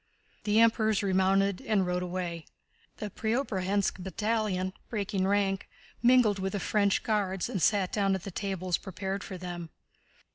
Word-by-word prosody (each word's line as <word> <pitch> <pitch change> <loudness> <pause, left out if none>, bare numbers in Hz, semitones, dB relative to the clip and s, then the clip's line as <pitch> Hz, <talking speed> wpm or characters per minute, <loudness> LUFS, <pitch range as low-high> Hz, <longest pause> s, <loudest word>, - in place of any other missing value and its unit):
The 210 +1 +3
Emperors 220 -2 +3
remounted 195 0 +2
and 210 -4 +1
rode 180 0 -1
away. 175 -2 -4 0.5
The 210 -1 -5
Preobrazhénsk 205 -5 0
battalion, 195 -1 -1 0.2
breaking 200 -3 -1
rank, 195 -1 +1 0.3
mingled 240 -4 +5
with 190 0 -2
the 200 - -1
French 200 0 +1
Guards 195 -4 0
and 190 - -3
sat 200 -1 +3
down 195 -2 +2
at 190 - -5
the 195 - -6
tables 185 -2 -2
prepared 190 0 -4
for 190 - -7
them. 175 -2 -6
195 Hz, 145 wpm, -29 LUFS, 185-210 Hz, 0.5 s, mingled